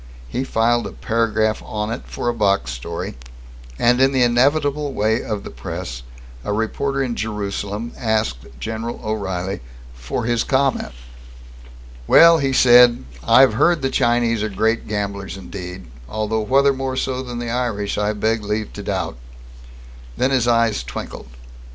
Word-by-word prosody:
He 125 - -2
filed 120 -1 +1
a - - -9
paragraph 110 -1 0
on 105 0 -3
it 115 - -4
for - - -5
a 120 - +2
box 100 - +1
story 65 +3 -5 0.6
and, 125 - +3
in 135 +1 +5
the 130 -2 +3
inevitable 140 +4 +2
way 110 +2 +1
of 105 -2 -4
the - - -8
press, - - -6 0.4
a - - -3
reporter 135 +6 -1
in 120 -3 -2
Jerusalem 105 +1 -4
asked 110 - -1
General 110 - -4
O'Reilly 95 -5 -3 0.3
for - - -4
his 120 -1 +1
comment. 135 - 0 1.1
"Well," 165 0 +7
he 135 -2 0
said, 120 - +6 0.2
"I've 130 -4 +6
heard 165 +6 +2
the 135 - 0
Chinese 120 -3 +2
are 110 - -1
great 110 +3 0
gamblers 100 -2 -3
indeed, 90 -2 -8 0.2
although 110 +1 -1
whether 135 +5 +3
more 130 -1 -3
so 130 0 -1
than 125 -2 -6
the 120 -1 -3
Irish 115 -5 -1
I 105 +1 +1
beg 110 +1 0
leave 105 +1 -3
to - - -7
doubt." - - -3 1.0
Then 130 - +1
his 125 -3 +2
eyes 115 - +2
twinkled. 60 +1 -7
115 Hz, 150 wpm, -20 LUFS, 105-125 Hz, 1.1 s, Well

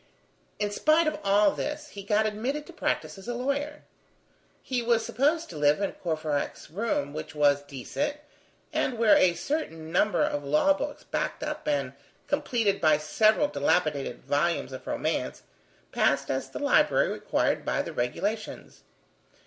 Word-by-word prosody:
In 205 - -1
spite 310 +9 +3
of 310 - -1
all 200 +1 +4
this, 295 0 -4
he 200 - -8
got 210 +2 +2
admitted 245 +8 -2
to 350 - -12
practice 265 - -2
as 195 - -12
a 240 - -2
lawyer. 285 +4 -2 0.8
He 255 -2 -1
was 235 -1 +2
supposed 305 +6 +1
to 160 - -8
live 145 +2 +4
in 200 - -1
Courfeyrac's 155 -5 -3
room, 175 -7 -1
which 155 0 -7
was 145 -1 +4
decent, 145 - -4 0.6
and 245 - 0
where 225 -2 +6
a 175 -2 +4
certain 170 - -3
number 210 +4 +2
of 145 - -1
law 150 - +4
books 290 0 -5
backed - - -3
up - - -4
and 295 -1 0 0.3
completed 215 -6 0
by 155 -2 +5
several 215 - +3
dilapidated 145 - 0
volumes 150 +1 0
of 130 - -9
romance, - - -2 0.5
passed - - +1
as - - -2
the - - -7
library - - +3
required - - 0
by - - 0
the - - -7
regulations. 205 - -3
205 Hz, 155 wpm, -27 LUFS, -, 0.8 s, where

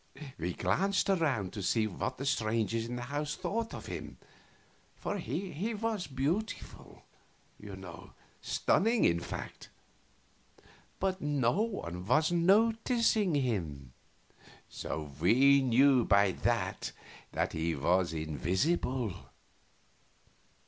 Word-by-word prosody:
We 85 +2 -2
glanced 195 +1 +1
around 135 - 0
to 105 - -5
see 110 +4 +2
what 105 - -3
the 135 - -5
strangers 115 -2 0
in 120 - -4
the 120 - -4
house 145 +3 -3
thought 225 +1 -3
of - - -7
him, - - -7 0.8
for 205 - -4
he 195 +5 -3
was 220 -3 -2
beautiful, 150 +12 -3 0.6
you - - -8
know - - -11 0.3
stunning, 225 +3 +2
in 85 - +3
fact - - -7 1.3
but 190 0 -1
no 145 - +1
one 90 - -3
was 155 +7 +3
noticing 220 - +3
him; 80 - -2 0.7
so 75 -2 -5
we 135 - +5
knew 130 0 +5
by 100 -2 +4
that - - -1 0.4
that - - -1
he 80 0 -1
was 85 +5 +2
invisible. 95 - -1
135 Hz, 110 wpm, -31 LUFS, -, 1.3 s, we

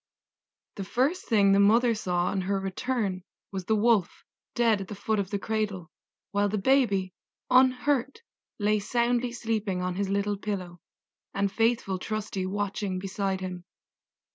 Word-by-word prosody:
The 200 - -3
first 270 - 0
thing 200 -3 +5
the 195 - +5
mother 230 +4 +5
saw 180 -5 -1
on 195 - -1
her 195 +1 -1
return 195 0 -2 0.3
was 190 -2 -5
the 220 - +2
Wolf 215 -3 +2 0.3
dead 225 -4 +3
at 190 - -6
the 210 - -7
foot 215 +2 -1
of 195 -2 -2
the 205 - -1
cradle, 200 -4 -3 0.4
while 205 0 +1
the 210 - -1
baby, 200 -6 +2 0.4
unhurt, 260 - +3 0.3
lay 210 0 +2
soundly 240 +3 0
sleeping 220 -6 -2
on 180 0 -1
his 200 -1 -1
little 200 +1 0
pillow, 185 -4 -5 0.6
and 200 0 +1
faithful 225 -4 +1
Trusty 205 -2 -3
watching 200 -1 -2
beside 195 0 -2
him. 180 -1 -5
205 Hz, 150 wpm, -27 LUFS, 190-230 Hz, 0.6 s, thing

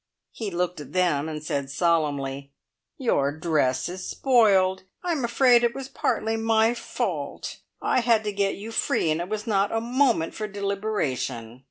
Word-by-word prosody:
He 220 -3 -4
looked 180 -2 -2
at - - -11
them 165 -5 +1
and 155 -1 -6
said 140 -2 -2
solemnly: 140 -4 0 0.5
"Your 145 - +1
dress 145 -5 0
is 185 +1 -6
spoiled! 200 -8 +3 0.2
I'm 335 -7 -1
afraid 240 0 +4
it 235 0 +1
was 270 -1 -6
partly 225 0 -1
my 225 +1 +3
fault. 240 - -4 0.3
I - - +2
had 230 -2 +3
to 210 - -2
get 200 -1 0
you 215 +3 -8
free, 165 -7 +1
and 155 +2 0
it 175 - -5
was 215 0 -3
not 200 -3 +1
a 225 - +1
moment 240 -7 +1
for 215 - -4
deliberation. 195 - -3
195 Hz, 165 wpm, -25 LUFS, 155-225 Hz, 0.5 s, afraid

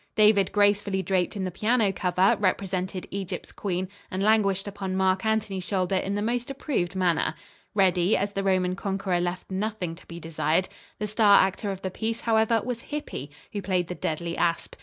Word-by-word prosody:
David, 210 -3 +5
gracefully 205 -2 +2
draped 185 +2 0
in 195 - -2
the 185 - -2
piano 215 +1 +2
cover, 185 0 +3
represented 190 -1 -1
Egypt's 195 -2 -5
queen, 185 -2 -2 0.2
and 185 +1 -2
languished 205 -2 +3
upon 195 -2 -4
Marc 190 0 +2
Antony's 220 -4 0
shoulder 185 0 -1
in 195 +1 0
the 205 - -1
most 240 +2 -1
approved 260 - -2
manner. 175 -4 +1 0.4
Reddy, 185 -1 +3
as 200 +1 -1
the 195 - -1
Roman 185 -1 +1
conqueror 195 -2 -1
left 175 +2 -3
nothing 190 -3 -2
to 165 - -14
be 170 0 -8
desired. 165 +2 0 0.3
The 210 - -2
star 210 -1 +6
actor 195 +2 -3
of 195 -1 -5
the 190 - -2
piece, 225 +4 -3
however, 220 -1 +2
was 245 -2 -3
Hippy, 290 - -5 0.2
who 205 - -2
played 180 -2 0
the - - -2
deadly 170 0 -3
asp. 170 -1 0
195 Hz, 180 wpm, -26 LUFS, 180-210 Hz, 0.4 s, star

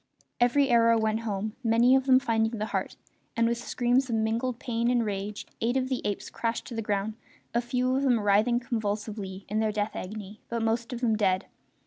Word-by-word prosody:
Every 270 +3 +3
arrow 230 -1 +5
went 220 0 +1
home, 215 -1 -3
many 235 +3 +5
of 265 0 +1
them 260 -1 +7
finding 225 -2 0
the 215 - -2
heart, - - -2 0.4
and 230 0 +3
with 235 0 0
screams 250 +2 +1
of 230 - 0
mingled 225 +3 0
pain 235 -1 -1
and 240 -2 +2
rage 205 0 -4 0.2
eight 240 +3 +1
of 260 0 -1
the 260 - -1
apes 205 - -3
crashed 230 0 -2
to - - -7
the 225 - -2
ground, 205 0 -1 0.4
a 235 - +2
few 250 +1 0
of 270 - +1
them 250 -4 +3
writhing 210 +4 +3
convulsively 210 -4 -3
in 215 +2 -1
their 220 -1 +1
death 210 0 -2
agony 205 +2 -7
but 235 -1 -2
most 230 +2 0
of 245 -1 -5
them 225 -3 +2
dead. 190 -3 +1
230 Hz, 205 wpm, -28 LUFS, 215-240 Hz, 0.4 s, them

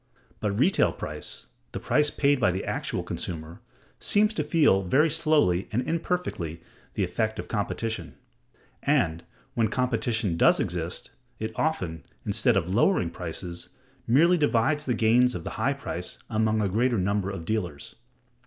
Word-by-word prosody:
But 105 -2 -1
retail 180 - +3
price, - - -3 0.3
the - - -3
price 150 -1 +2
paid 140 -1 +2
by 100 - +3
the 95 +2 -3
actual - - -2
consumer, 80 -1 -5 0.4
seems 210 +1 +3
to - - -1
feel 145 - +4
very 140 - +3
slowly 150 - +2
and 125 +4 -1
imperfectly 165 - -2 0.4
the 100 - +1
effect 110 +5 -1
of - - -5
competition; 105 -3 -3 0.7
and, 80 +1 +1 0.3
when 115 -2 +2
competition 110 -5 0
does - - +5
exist, - - -3 0.3
it 110 0 -4
often, 90 - -1 0.2
instead 110 +2 +2
of 90 -1 -1
lowering 115 - +3
prices, 85 0 -6 0.4
merely 165 +9 +5
divides 145 +2 +2
the 125 - 0
gains 120 +2 +4
of 85 - -5
the - - -5
high - - +2
price - - -5
among 110 0 +2
a 105 - +1
greater 115 +5 +1
number 100 +1 0
of 95 -4 -6
dealers. 90 -8 -3
110 Hz, 150 wpm, -26 LUFS, 90-140 Hz, 0.7 s, does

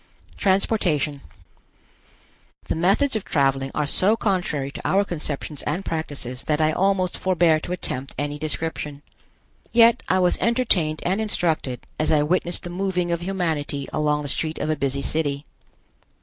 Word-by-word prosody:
TRANSPORTATION. 180 -8 +1 1.5
The - - 0
methods 200 - +2
of 215 - -1
traveling 135 -2 +1
are 150 - +1
so 200 +9 +3
contrary 175 -10 -1
to - - -8
our 195 +1 +3
conceptions 150 -4 -4
and 170 +6 -3
practices 140 -6 -4
that 150 0 +1
I 155 0 +3
almost 185 +1 +1
forbear 170 -4 +3
to 175 - -7
attempt 135 -6 -2
any 145 +1 -3
description. 150 -1 -4 0.7
Yet 235 0 +6
I 185 - +3
was 180 -1 +3
entertained 210 -11 +1
and 190 +5 +1
instructed 160 - -1 0.2
as 155 - +2
I 150 -2 +4
witnessed 175 +2 +1
the 175 - -6
moving 180 -1 -1
of 170 0 -1
humanity 160 -7 -2
along 150 -1 +1
a - - -3
street 155 +3 -2
of 155 - -1
a - - +1
busy 140 -1 -1
city. 145 -2 -1
160 Hz, 150 wpm, -23 LUFS, 145-185 Hz, 1.5 s, Yet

